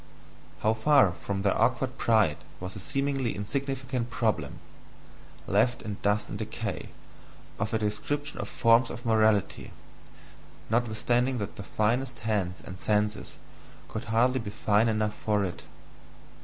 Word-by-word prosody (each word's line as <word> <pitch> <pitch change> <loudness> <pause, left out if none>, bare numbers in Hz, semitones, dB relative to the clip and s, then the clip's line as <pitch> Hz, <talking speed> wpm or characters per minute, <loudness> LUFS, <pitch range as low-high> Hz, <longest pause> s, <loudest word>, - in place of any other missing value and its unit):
How 110 - +3
far 110 -3 +5
from 95 +3 -4
their 100 - +2
awkward 130 +1 +1
pride 110 -10 +3 0.2
was 90 +1 -6
the - - -7
seemingly 135 +1 -1
insignificant 130 +2 -2
problem 115 -3 -1 0.9
left 115 +5 +2
in 105 -2 -5
dust 105 +1 +1
and - - -6
decay - - -4 0.7
of 100 +1 -1
a 110 - +2
description 145 +8 -2
of - - -4
forms 115 +1 +4
of 120 +1 -7
morality, 110 -3 +2 1.0
notwithstanding 120 +2 +1
that 100 -4 -4
the - - -7
finest 120 +6 -1
hands 100 -5 -1
and 90 -1 -8
senses 105 +3 0 0.5
could - - -5
hardly 125 +4 +2
be 110 -3 -5
fine 105 +2 +2
enough 110 -1 0
for 105 -2 0
it! 90 -2 -5
110 Hz, 135 wpm, -28 LUFS, 105-125 Hz, 1.0 s, far